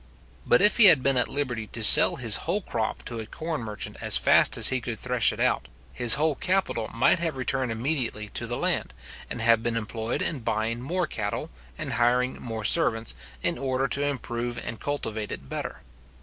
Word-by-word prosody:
But 120 - +4
if 210 - +5
he 230 - +7
had 155 -9 +7
been 135 -1 +2
at 125 - +2
liberty 125 -6 -4
to 115 - -5
sell - - +9
his 115 -4 +3
whole 190 +4 -3
crop 110 -8 -4
to 115 -1 -6
a 110 - -7
corn 160 +3 -5
merchant 105 -2 -6
as - - +4
fast - - +4
as - - +4
he 130 -1 -2
could 115 -1 -5
thresh 125 0 +1
it - - -9
out, - - 0 0.3
his 120 -1 +4
whole 155 +2 0
capital 180 - -2
might 125 +9 +2
have 165 -5 -3
returned 130 -1 -2
immediately 115 -3 -3
to - - -3
the - - -4
land, 65 - -1 0.3
and - - -5
have 115 -1 +3
been 115 0 -2
employed 115 +1 -3
in 155 - +1
buying 110 +1 -3
more 175 +7 -2
cattle, - - -5 0.3
and - - -4
hiring 125 +2 0
more 115 -2 -6
servants, 115 -3 +2 0.3
in - - -1
order 135 0 -1
to 140 - -1
improve 120 -3 -4
and 115 -1 -7
cultivate 110 -7 -4
it 70 - -8
better. - - -6
120 Hz, 200 wpm, -25 LUFS, 115-140 Hz, 0.3 s, sell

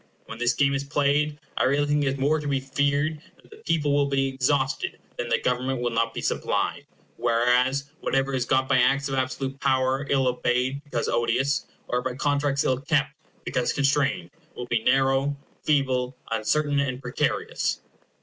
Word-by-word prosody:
When 115 - -9
this 120 +1 +2
game 140 -1 +3
is 140 0 -1
played, 145 +1 +1 0.2
I - - +3
really 140 +3 +2
think 145 0 +1
it - - 0
is 135 +1 0
more 145 +4 +2
to 150 - -5
be 140 -1 +1
feared 145 +3 0 0.2
that - - -23
the 435 - -12
people 155 - 0
will 145 0 +3
be 135 -1 +1
exhausted, 135 - 0 0.2
than - - -4
that - - +1
Government 125 +1 0
will 120 0 -1
not 115 0 +1
be - - -5
supplied; - - -1 0.3
whereas, 125 +4 +2 0.2
whatever 135 0 0
is 130 -2 +1
got 130 +1 +1
by 135 -2 +3
acts 140 +2 +2
of - - -3
absolute 135 +1 -2
power 130 +1 +1
ill 135 -2 +2
obeyed, 125 +2 0
because 120 -5 -2
odious, 120 +4 +1 0.2
or 125 - 0
by 125 0 -3
contracts 145 0 +1
ill 130 -1 +1
kept, 140 -1 +1 0.3
because 125 -1 0
constrained, 140 -10 +1 0.2
will 125 - -5
be 120 -2 0
narrow, 135 +3 +2 0.3
feeble, 130 -4 +1
uncertain, 145 +6 +1
and 130 -3 -1
precarious. 125 -2 -1
135 Hz, 180 wpm, -25 LUFS, 125-145 Hz, 0.3 s, game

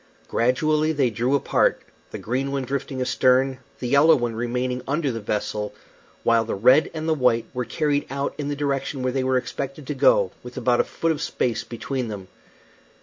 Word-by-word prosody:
Gradually 155 +6 +1
they 135 -5 +1
drew 120 +6 +1
apart, 140 - +1 0.3
the - - -6
green 130 +4 -2
one 140 -1 -1
drifting 135 0 -4
astern, 130 +1 +2 0.2
the 125 - -4
yellow 140 +6 +6
one 120 -2 -1
remaining 125 +2 -2
under 140 0 0
the 115 - -4
vessel, 105 0 -3 0.5
while 115 -1 +4
the 115 - -3
red 125 +9 +5
and 155 0 -3
the 160 - +3
white 125 -5 +2
were 125 -1 -2
carried 145 0 0
out 140 +1 -2
in 145 - -2
the 145 - -2
direction 140 -1 -2
where 130 -1 0
they 135 -1 0
were 130 0 +2
expected 135 +3 -5
to - - -3
go, - - +4
with - - -11
about - - +2
a - - -4
foot 165 - -1
of 155 -1 -3
space 125 -7 -1
between 125 +1 -4
them. 100 -4 -7
130 Hz, 195 wpm, -23 LUFS, 120-145 Hz, 0.5 s, yellow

